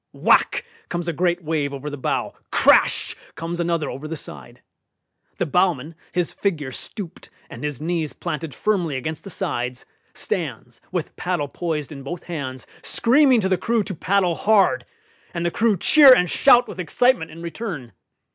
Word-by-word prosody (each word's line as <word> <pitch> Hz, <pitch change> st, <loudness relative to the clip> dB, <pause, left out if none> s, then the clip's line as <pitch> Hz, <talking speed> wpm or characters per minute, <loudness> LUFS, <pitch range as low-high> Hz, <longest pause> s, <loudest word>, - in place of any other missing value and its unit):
Whack! -, -, +3 dB, 0.2 s
comes 175 Hz, -1 st, -3 dB
a 170 Hz, -, 0 dB
great 175 Hz, +2 st, 0 dB
wave 150 Hz, -3 st, -1 dB
over 140 Hz, +2 st, -7 dB
the 145 Hz, -, -4 dB
bow; 135 Hz, -, -2 dB, 0.2 s
crash! -, -, +4 dB, 0.2 s
comes 165 Hz, +2 st, -5 dB
another 170 Hz, -3 st, 0 dB
over 140 Hz, +4 st, -6 dB
the 165 Hz, +1 st, -5 dB
side. 70 Hz, -, -11 dB, 0.7 s
The -, -, 0 dB
bowman, 165 Hz, -2 st, +1 dB, 0.2 s
his 175 Hz, -2 st, -1 dB
figure 155 Hz, -9 st, -2 dB
stooped, 175 Hz, -, -7 dB, 0.2 s
and -, -, -9 dB
his 145 Hz, -4 st, -3 dB
knees 160 Hz, -1 st, -2 dB
planted 155 Hz, +1 st, -5 dB
firmly 180 Hz, -9 st, 0 dB
against 155 Hz, +4 st, -5 dB
the 195 Hz, -, -8 dB
sides, 125 Hz, -7 st, -3 dB, 0.3 s
stands, -, -, -4 dB
with -, -, -3 dB
paddle 145 Hz, -, -1 dB
poised 160 Hz, -4 st, -3 dB
in 140 Hz, -2 st, -8 dB
both 165 Hz, +6 st, -6 dB
hands, 130 Hz, -7 st, -5 dB, 0.2 s
screaming 255 Hz, 0 st, +4 dB
to 190 Hz, -, 0 dB
the 185 Hz, -, +1 dB
crew 230 Hz, -2 st, +1 dB
to 195 Hz, -, -5 dB
paddle 185 Hz, +1 st, +1 dB
hard; 190 Hz, -, +2 dB, 0.5 s
and 170 Hz, 0 st, -2 dB
the 170 Hz, -, +1 dB
crew 220 Hz, 0 st, +2 dB
cheer 275 Hz, -, +8 dB
and 180 Hz, -5 st, +1 dB
shout 245 Hz, -3 st, +5 dB
with 195 Hz, -, -9 dB
excitement 235 Hz, -, +2 dB
in 165 Hz, +1 st, -10 dB
return. 170 Hz, -, -6 dB
170 Hz, 165 wpm, -22 LUFS, 150-190 Hz, 0.7 s, cheer